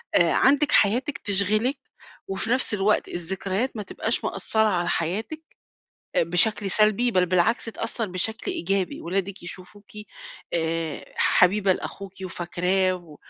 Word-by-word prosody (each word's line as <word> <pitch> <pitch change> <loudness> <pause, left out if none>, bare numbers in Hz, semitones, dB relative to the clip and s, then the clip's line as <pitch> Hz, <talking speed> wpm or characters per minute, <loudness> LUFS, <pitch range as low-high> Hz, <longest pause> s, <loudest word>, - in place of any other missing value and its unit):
آآ 170 -1 +4
عندِك 285 +2 +3
حياتِك 245 +8 +3
تشغلِك، 215 +6 +1 0.5
وفي 195 +3 -3
نفْس 255 -2 +4
الوقت 210 +1 +1
الذكريات 190 +7 -3
ما 210 - -4
تبقاش - - -2
مأثّرة 220 0 0
على 175 -3 -1
حياتِك 215 - -2 0.8
آآ - - +4
بشكل 195 +4 +2
سلبي، 215 +4 +3
بل 185 -3 +2
بالعكس 180 +5 +1
تأثّر 225 -1 -3
بشكل 195 +4 -2
إيجابي 190 +1 -2
ولادِك 195 +2 -3
يشوفوكِ 185 +4 -11 0.6
آآ 165 -2 -2
حبيبة 190 +1 +3
لأخوكِ 195 +1 -7
وفاكراه، 185 +1 0
و 170 -5 -12
195 Hz, 125 wpm, -24 LUFS, 180-215 Hz, 0.8 s, آآ